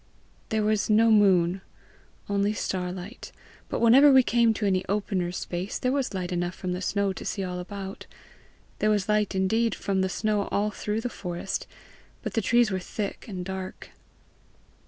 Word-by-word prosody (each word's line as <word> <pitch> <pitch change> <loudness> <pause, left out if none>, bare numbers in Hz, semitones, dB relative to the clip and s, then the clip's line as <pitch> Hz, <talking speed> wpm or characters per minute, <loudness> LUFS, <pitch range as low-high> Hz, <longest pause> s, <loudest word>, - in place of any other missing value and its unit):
"There 220 -1 +1
was 215 0 +1
no 225 +1 +5
moon 190 -3 +4 0.7
only 200 +1 +1
star 180 -3 -2
light; 190 +6 -8 0.4
but - - -2
whenever 265 +5 +7
we 265 -1 +7
came 235 -1 +3
to 210 - -2
any 190 -2 +2
opener 195 -3 -1
space, 180 +2 -4
there 255 - 0
was 275 -1 0
light 180 -1 -3
enough 175 0 -2
from 185 - -4
the 180 - -4
snow 200 0 0
to - - -8
see 195 - -3
all 180 -1 -4
about; 195 +1 -7 0.7
there 215 - +2
was 205 -3 +1
light 210 -2 +1
indeed 220 +5 +1
from 195 -1 -1
the 190 - 0
snow 210 0 0
all 210 +1 +1
through 210 +1 -3
the 245 - -2
forest, 180 -2 -4 0.6
but - - -4
the 225 - +1
trees 240 +1 +3
were 190 - -1
thick 200 +2 -5
and 185 -4 -5
dark. 190 0 -6
200 Hz, 175 wpm, -26 LUFS, 185-215 Hz, 0.7 s, whenever